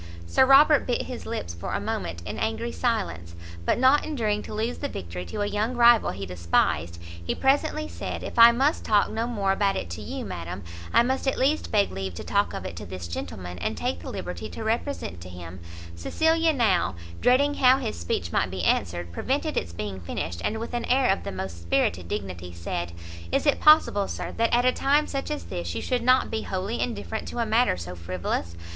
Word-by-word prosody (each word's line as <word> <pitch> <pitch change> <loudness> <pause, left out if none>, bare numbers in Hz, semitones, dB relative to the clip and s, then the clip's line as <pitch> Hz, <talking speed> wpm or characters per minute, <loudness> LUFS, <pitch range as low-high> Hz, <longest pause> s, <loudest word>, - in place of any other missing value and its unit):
Sir 260 - +4
Robert 285 +2 +6
bit 245 - 0
his 250 - -7
lips 85 -1 -4
for 85 - -5
a - - 0
moment 85 0 -4
in - - -5
angry 80 - -1
silence; 85 +1 -2 0.3
but - - +2
not 260 +4 +5
enduring 220 -9 -1
to - - -8
lose 225 +3 -2
the 285 - -2
victory 90 - -6
to 85 - -4
a - - +1
young 215 +4 -1
rival 235 -1 +6
he 95 +1 -5
despised, 85 -2 0 0.2
he 85 - -2
presently 305 +3 +1
said, - - -5
"If - - -4
I 230 0 +11
must 270 +6 +1
talk 210 -2 +3
no 225 +2 -1
more 200 -5 0
about 195 0 +1
it 85 - -4
to 85 - -5
you, - - -5
madam, 85 +3 -6 0.3
I - - +5
must 265 +2 -1
at 270 - +1
least 290 +4 +1
beg 205 -2 +3
leave 95 -1 -5
to - - -6
talk - - 0
of - - -6
it - - -5
to 105 - -6
this 90 -1 -6
gentleman, 90 +1 -6
and - - -2
take 85 - -2
the 85 - -8
liberty 90 +5 -5
to - - -7
represent 220 - -2
to 90 - -9
him 90 0 -9 0.2
" 85 0 -12
Cecilia 320 - +2
now, 200 - +2 0.3
dreading 280 +4 +4
how 260 -2 +5
his 270 - -3
speech 85 0 -2
might - - +1
be 95 -1 -4
answered, 85 -2 0
prevented 280 - -1
its 85 - -2
being 95 +2 -5
finished, 85 -1 -4
and 220 - -1
with 230 - -6
an 240 -1 -1
air 255 -1 +3
of 195 - -1
the 200 - -4
most 85 - -6
spirited 85 +1 0
dignity, 90 -3 -5
said, 85 0 -4 0.4
"Is - - +1
it 290 - +3
possible, 305 -10 +5
sir, - - -5
that 230 0 +2
at 240 +1 +3
a 255 - +6
time 290 +2 +2
such 275 -1 -4
as 90 - -3
this, 85 0 -5
you - - -2
should 250 -1 0
not 255 +2 +3
be 220 -1 -1
wholly 195 +4 -3
indifferent 220 -2 -3
to - - -7
a 235 - +1
matter 225 - +3
so 90 +1 -6
frivolous? 85 -1 -3
190 Hz, 220 wpm, -26 LUFS, -, 0.4 s, I